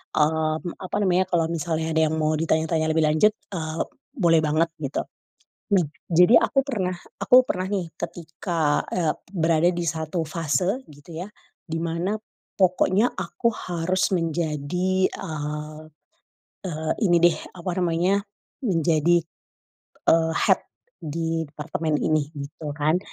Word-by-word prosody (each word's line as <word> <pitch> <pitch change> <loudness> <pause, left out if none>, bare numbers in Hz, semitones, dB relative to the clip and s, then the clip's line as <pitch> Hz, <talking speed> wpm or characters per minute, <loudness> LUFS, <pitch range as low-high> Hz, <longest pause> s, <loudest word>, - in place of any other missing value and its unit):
eee, 155 +1 +2
m 175 - -3
apa 185 +2 -5
namanya 185 0 +2
kalau 170 -2 +1
misalnya 160 -1 -1
ada 160 0 +3
yang 160 - -1
mau 155 0 +1
ditanya-tanya 160 0 +1
lebih 160 0 +2
lanjut, 155 +8 +4 0.2
eee, 160 -3 -2 0.3
boleh 170 - +4
banget 155 +2 +2
gitu, 140 -1 -2 0.7
mem 185 -5 +4 0.2
jadi 180 +7 +6
aku - - 0
pernah 185 -9 -1 0.3
aku 250 - +6
pernah 185 0 -1
nih 190 -4 -1
ketika, 165 -2 -2
eee, 165 -4 +1 0.2
berada 165 -2 +3
di 175 -1 -3
1 160 +1 -2
fase 175 - 0
gitu 145 +3 -13
ya, 200 - -8 0.3
di 165 -1 -4
mana 170 +6 -1 0.4
pokoknya 185 +3 +3
aku 235 - -1
harus 180 +2 -1
menjadi, 170 +2 0
eee 150 -3 -5 0.8
eee, 160 -3 -2
ini 175 -4 +5
deh 175 -2 +5 0.2
apa 180 +1 -3
namanya 180 +3 +1 0.4
menjadi, 170 -3 +3 0.9
eee, 160 0 +4
head - - +3 0.4
di 165 +1 -2
departement 155 +1 -2
ini 155 -1 0
gitu 145 +1 -6
kan, 155 +3 +2
165 Hz, 130 wpm, -24 LUFS, 155-180 Hz, 0.9 s, jadi